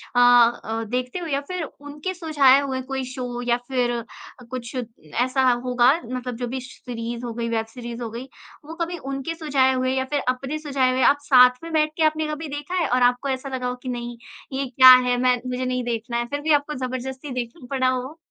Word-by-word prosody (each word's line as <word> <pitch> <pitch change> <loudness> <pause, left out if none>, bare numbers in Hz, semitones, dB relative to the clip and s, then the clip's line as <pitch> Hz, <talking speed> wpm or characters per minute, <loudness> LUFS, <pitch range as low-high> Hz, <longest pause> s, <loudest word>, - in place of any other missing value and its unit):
अ - - +4
अ, 240 -2 +4
देखते 250 +6 -2
हो? 345 - -5
या 280 -2 -1
फिर 365 -2 -3
उनके 295 +4 -7
सुझाव 285 -6 +4
हुए 260 -1 -2
कोई 265 0 -4
शो 245 -2 -5
या 240 - +4
फिर 250 -2 0
अ, 235 -1 -4 0.5
कुछ 250 0 -6 0.5
ऐसा 260 +1 0 0.2
होगा 250 0 +4
मतलब 250 0 -5
जो 245 0 -3
भी 260 +2 -4
श 255 - -12
सीरीज़ 235 +1 -5
हो 235 - -4
गई, 230 0 -3
वेब 225 -1 -1
सीरीज़ 235 +1 -8
हो 230 - -4
गई, 240 +4 -7 0.4
वो 315 - -8
कभी 345 +1 -2
उनके 275 +4 -4
सुझाव 275 -5 +2
हुए 255 0 0
या 260 0 0
फिर 290 - +2
अपने 265 +4 -2
सुझाव 275 -4 +1
हुए 260 - 0
आप 285 - -2
साथ 250 -1 +5
में 330 - -7
बैठ 305 -1 +2
के 325 - +2
आपने 310 0 +1
कभी 305 +1 -4
देखा 290 +5 -5
है 345 -3 +1
और 250 +1 +2
आपको 245 +3 +2
ऐसा 265 +1 -3
लगा 255 -1 -3
हो 250 - -2
कि, 255 +1 -8
"नहीं, 240 -1 -5 0.4
ये 275 +1 -1
क्या 260 +1 +8 0.2
है? 245 0 +2
मैं 250 0 +2
मुझे 250 0 -2
नहीं 250 0 -1
देखना 235 0 -3
है।" 240 - -1
फिर 285 +4 -4
भी 315 +1 0
आपको 290 +1 +1
ज़बरदस्ती 260 +2 -5
देखना 250 +2 -5
पड़ा 260 -1 +2
हो? 255 +4 -3
255 Hz, 225 wpm, -23 LUFS, 245-285 Hz, 0.5 s, क्या